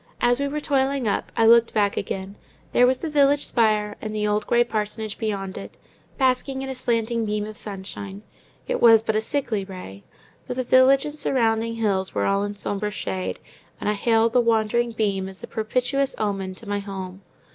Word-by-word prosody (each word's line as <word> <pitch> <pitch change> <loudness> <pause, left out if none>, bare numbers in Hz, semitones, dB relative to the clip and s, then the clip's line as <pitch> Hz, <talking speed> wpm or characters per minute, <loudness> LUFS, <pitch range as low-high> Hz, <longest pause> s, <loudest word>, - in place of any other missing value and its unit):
As 245 +1 +3
we 280 - 0
were 295 +2 -3
toiling 275 -3 0
up, 200 - -1
I 225 - +4
looked 230 0 +5
back 205 -2 +2
again; 195 0 -4 0.4
there 245 - +5
was 260 0 +2
the 330 - -5
village 285 0 +3
spire, 215 -3 +1
and 215 0 -5
the 210 0 0
old 210 0 0
grey 240 0 +4
parsonage 215 -2 -4
beyond 200 -4 -3
it, - - -10 0.4
basking 265 0 +1
in 270 - -5
a - - -2
slanting 235 -2 0
beam 210 -1 -1
of 215 0 -8
sunshine—it 200 - -7
was 225 -2 +7
but 220 - -1
a 215 - +2
sickly 225 -4 -1
ray, 180 - -10 0.4
but 250 - -4
the 255 - 0
village 260 +2 +5
and 300 0 -7
surrounding 230 -3 +1
hills 200 -4 -1
were - - +1
all 195 0 +1
in 205 0 -4
sombre 205 +1 -2
shade, 95 - -4 0.4
and - - -4
I 210 - +2
hailed 225 +2 +2
the 250 - +5
wandering 230 +1 +1
beam 200 -4 -1
as 190 - -10
a - - -6
propitious 255 +5 -1
omen 195 -3 -2
to 220 - -10
my 205 0 -1
home. 190 -1 -7
220 Hz, 195 wpm, -24 LUFS, 205-245 Hz, 0.4 s, was